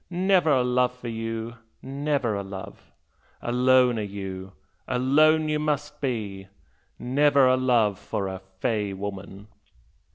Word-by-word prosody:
Never 180 Hz, -2 st, +2 dB
a 130 Hz, -4 st, +4 dB
love 125 Hz, 0 st, +1 dB
for 120 Hz, -1 st, -7 dB
you 115 Hz, +1 st, -5 dB, 0.3 s
never 140 Hz, -3 st, -1 dB
a 100 Hz, -, -2 dB
love! 95 Hz, -1 st, -9 dB, 0.5 s
Alone 125 Hz, 0 st, +3 dB
you 95 Hz, -1 st, -7 dB, 0.3 s
are, 130 Hz, -, -2 dB
alone 155 Hz, +5 st, +4 dB
you 150 Hz, 0 st, 0 dB
must 150 Hz, 0 st, -2 dB
be! 105 Hz, -8 st, -3 dB, 0.5 s
Never 140 Hz, +2 st, +3 dB
a 130 Hz, -, +4 dB
love 120 Hz, -6 st, +2 dB
for 100 Hz, -, -3 dB
a 95 Hz, 0 st, -5 dB
"fey" 100 Hz, +2 st, -3 dB
woman!' 100 Hz, +1 st, -7 dB
125 Hz, 130 wpm, -25 LUFS, 100-140 Hz, 0.5 s, a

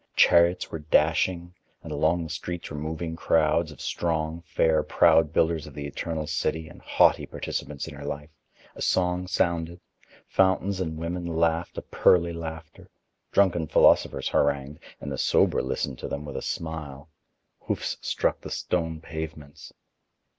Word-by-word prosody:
Chariots 85 Hz, +1 st, +4 dB
were 80 Hz, -, -4 dB
dashing, 85 Hz, +3 st, +1 dB, 0.3 s
and -, -, -8 dB
along 85 Hz, +2 st, +1 dB
the 80 Hz, -, -7 dB
streets 85 Hz, +1 st, -5 dB
were -, -, -5 dB
moving 80 Hz, +2 st, -4 dB
crowds 80 Hz, 0 st, +2 dB
of 75 Hz, -, -14 dB
strong, 80 Hz, -1 st, -2 dB
fair, 80 Hz, -1 st, +2 dB
proud 80 Hz, 0 st, +4 dB
builders 80 Hz, -1 st, +1 dB
of 75 Hz, -, -12 dB
the 75 Hz, -, -5 dB
eternal 80 Hz, +2 st, -4 dB
city 80 Hz, +1 st, -2 dB
and 80 Hz, -, -14 dB
haughty -, -, +3 dB
participants 75 Hz, 0 st, -5 dB
in 80 Hz, -, -8 dB
her 70 Hz, 0 st, -9 dB
life; 75 Hz, +1 st, -5 dB, 0.4 s
a -, -, -11 dB
song 90 Hz, 0 st, +1 dB
sounded; 85 Hz, -1 st, 0 dB, 0.5 s
fountains 95 Hz, 0 st, +2 dB
and 80 Hz, -3 st, -3 dB
women 85 Hz, +2 st, -3 dB
laughed 85 Hz, 0 st, 0 dB
a -, -, -4 dB
pearly 85 Hz, -1 st, +3 dB
laughter; 80 Hz, -1 st, -8 dB, 0.4 s
drunken 90 Hz, -5 st, +3 dB
philosophers -, -, +4 dB
harangued, 70 Hz, 0 st, 0 dB, 0.2 s
and 70 Hz, -, -6 dB
the 65 Hz, -, -4 dB
sober -, -, +3 dB
listened 65 Hz, 0 st, -3 dB
to -, -, -5 dB
them 70 Hz, +1 st, -5 dB
with 70 Hz, -, -7 dB
a -, -, -3 dB
smile; 80 Hz, -3 st, -5 dB, 0.5 s
hoofs -, -, -3 dB
struck -, -, -1 dB
the -, -, -8 dB
stone 80 Hz, -3 st, -2 dB
pavements. 80 Hz, -3 st, -8 dB
80 Hz, 155 wpm, -26 LUFS, 75-85 Hz, 0.5 s, Chariots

